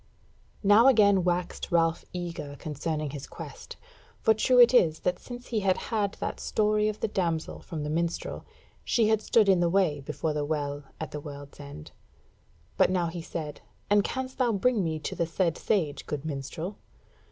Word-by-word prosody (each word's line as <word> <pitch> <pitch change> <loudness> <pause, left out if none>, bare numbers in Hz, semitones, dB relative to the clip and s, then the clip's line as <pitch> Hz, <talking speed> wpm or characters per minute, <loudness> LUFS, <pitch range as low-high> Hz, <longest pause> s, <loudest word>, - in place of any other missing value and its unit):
Now 205 +5 +7
again 205 -7 +5
waxed 180 +2 -1
Ralph 165 -1 +2
eager 170 -5 -5
concerning 155 0 -3
his 140 -2 -7
quest; - - -9 0.4
for 220 - +4
true 250 +4 +3
it 240 +1 +8
is 160 -10 +4
that 180 0 0
since 245 0 -9
he 225 - 0
had 190 -2 +2
had 210 -3 -1
that - - -4
story 215 0 +1
of 215 - -6
the - - +1
damsel 170 -6 -2
from 160 -4 -5
the 150 - -3
minstrel, 170 +1 -2 0.4
she 225 -3 +2
had 220 -1 +3
stood 215 -1 +3
in 190 -2 +5
the 175 -1 +2
way 175 -5 +2
before 155 +3 -3
the 150 -1 -1
Well 145 -1 -3
at 160 - -5
the 150 - -4
World's 145 -1 -10
End. 140 - -10 0.9
But - - +5
now 180 -2 +1
he 170 0 -6
said: 155 -2 -6 0.3
"And 205 0 +5
canst 260 +3 -4
thou 245 -3 +3
bring 215 +1 +2
me 160 -2 -1
to 155 - -5
the 170 - -1
said 170 0 0
sage, 160 -9 -1
good 150 0 -4
minstrel?" 160 +6 -5
175 Hz, 185 wpm, -28 LUFS, 155-210 Hz, 0.9 s, it